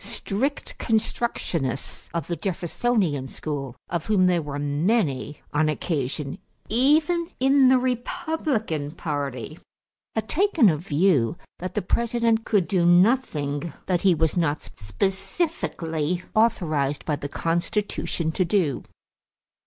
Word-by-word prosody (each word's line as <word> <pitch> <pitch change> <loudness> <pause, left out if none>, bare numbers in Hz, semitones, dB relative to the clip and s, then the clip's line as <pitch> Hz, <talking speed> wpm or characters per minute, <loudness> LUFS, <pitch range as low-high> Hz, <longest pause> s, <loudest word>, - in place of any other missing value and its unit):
Strict 265 +9 -3
constructionists 210 - -1
of 170 -4 -2
the 170 - -2
Jeffersonian 180 - -1
school, 135 -4 -5
of 170 -2 -3
whom 200 -4 +4
there 180 -2 +3
were 145 -2 -5
many 145 - 0
on 155 +1 +3
occasion 145 -2 -2 0.3
even 310 +8 +3
in 270 +1 +5
the 260 0 +6
Republican 250 - -1
party, 145 -3 -4 0.6
had 220 -1 -1
taken 330 - +4
a 155 - -1
view 160 -4 +2 0.2
that 185 +1 -5
the - - 0
President 230 +2 +1
could 200 -6 +2
do 185 -4 +2
nothing 175 - +2
that 180 -2 +1
he 190 -3 +4
was 160 -1 +1
not 155 -4 0
specifically 175 - -2
authorized 155 -11 +1
by 150 - 0
the 145 0 -6
Constitution 170 0 -1
to 185 - +1
do. 170 -6 +1
175 Hz, 120 wpm, -25 LUFS, 150-225 Hz, 0.6 s, the